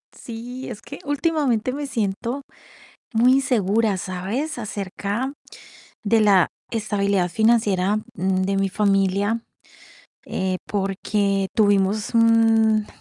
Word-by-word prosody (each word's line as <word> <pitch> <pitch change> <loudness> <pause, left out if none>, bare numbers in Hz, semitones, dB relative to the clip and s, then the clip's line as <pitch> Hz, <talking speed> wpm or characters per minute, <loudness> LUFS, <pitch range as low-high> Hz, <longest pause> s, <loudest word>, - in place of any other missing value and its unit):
Sí. 245 +3 -8
Es 215 -3 -8
que 280 - -10
últimamente, 285 -5 0
me 285 +1 -4
siento 235 +2 -2 0.7
muy 245 +3 +5
insegura, 225 -6 +1
¿sabes? 200 - -4
Acerca 210 +3 -3 0.7
de 225 +1 +3
la 195 -4 +5 0.2
estabilidad 200 -4 0
financiera, 210 -1 +2 0.2
mm, 185 +1 0
de 195 +1 0
mi 195 0 +1
familia, 200 +2 +1 0.9
eh, 185 -1 -1
porque 195 0 -1
tuvimos 205 0 +2
un 225 -1 +4
215 Hz, 100 wpm, -22 LUFS, 195-235 Hz, 0.9 s, muy